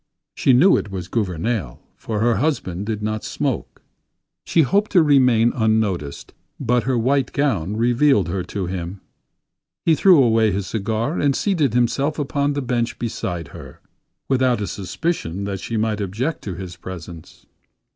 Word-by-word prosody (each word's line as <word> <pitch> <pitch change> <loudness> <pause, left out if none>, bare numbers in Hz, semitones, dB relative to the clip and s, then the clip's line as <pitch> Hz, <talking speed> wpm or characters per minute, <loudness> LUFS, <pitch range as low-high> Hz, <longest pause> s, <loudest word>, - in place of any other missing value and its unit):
She - - +2
knew 160 +10 +6
it - - -4
was 95 -3 -5
Gouvernail, 95 - -2 0.2
for 105 -2 -4
her 120 0 +2
husband 105 - -1
did 110 -2 -3
not 110 0 -2
smoke. - - -3 0.6
She 165 - +3
hoped 200 +9 +1
to 175 -4 +6
remain 125 -6 +4
unnoticed, 110 - -1 0.3
but 125 -2 +1
her 130 -1 +1
white 130 +2 +1
gown 105 - 0
revealed 120 - +3
her 90 +2 -2
to 95 +1 -4
him. 90 +1 -5 0.9
He 165 - +5
threw 170 -3 +6
away 110 -2 +3
his 95 0 -2
cigar 110 - -2
and 140 -2 +2
seated 155 - +1
himself 135 +5 +1
upon 145 0 0
the 140 -1 -2
bench 120 -1 -1
beside 90 -9 -4
her; - - -11 0.5
without 130 -3 +2
a 105 - -2
suspicion 100 - -3
that 100 -1 -3
she 115 +4 -4
might 110 -1 0
object 110 - -2
to 95 -4 -4
his 90 -1 -8
presence. 85 -2 -10
115 Hz, 155 wpm, -21 LUFS, 95-135 Hz, 0.9 s, knew